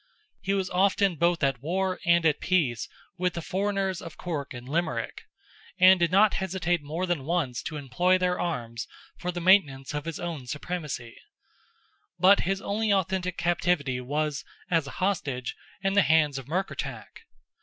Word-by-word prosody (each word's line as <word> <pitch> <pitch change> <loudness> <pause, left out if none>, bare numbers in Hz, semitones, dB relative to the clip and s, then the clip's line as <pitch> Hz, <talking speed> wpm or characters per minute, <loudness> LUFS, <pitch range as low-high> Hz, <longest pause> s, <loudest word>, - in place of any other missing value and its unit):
He 195 0 0
was 190 -2 -1
often 195 0 +3
both 170 0 +1
at 135 -3 +1
war 185 +4 -1
and 170 -1 +4
at 155 -2 +3
peace 155 -11 0 0.3
with 180 0 0
the 170 - -3
foreigners 195 0 -1
of 165 - -9
Cork 155 -6 -4
and 120 -1 -8
Limerick, 155 -6 -2 0.5
and 185 0 +7
did 170 -1 +2
not 200 +2 +5
hesitate 175 -3 0
more 160 +5 -3
than 175 -6 -1
once 150 -6 -1
to 155 - -5
employ 160 +7 +2
their 180 -1 0
arms 120 -10 -3 0.3
for 180 -1 -3
the 175 - -4
maintenance 150 -8 +3
of 150 0 -3
his 165 -2 -4
own 165 -7 -5
supremacy; 150 -5 -5 1.0
but 190 +3 +6
his 195 0 -1
only 215 +1 0
authentic 185 -2 0
captivity 170 -7 0
was, 145 +2 -2 0.3
as 165 -4 +2
a - - -9
hostage, 145 -10 -1 0.3
in 195 0 +1
the 200 - +6
hands 150 -5 +3
of 130 - -11
Murkertach. 185 +6 -4
170 Hz, 165 wpm, -27 LUFS, 145-185 Hz, 1.0 s, and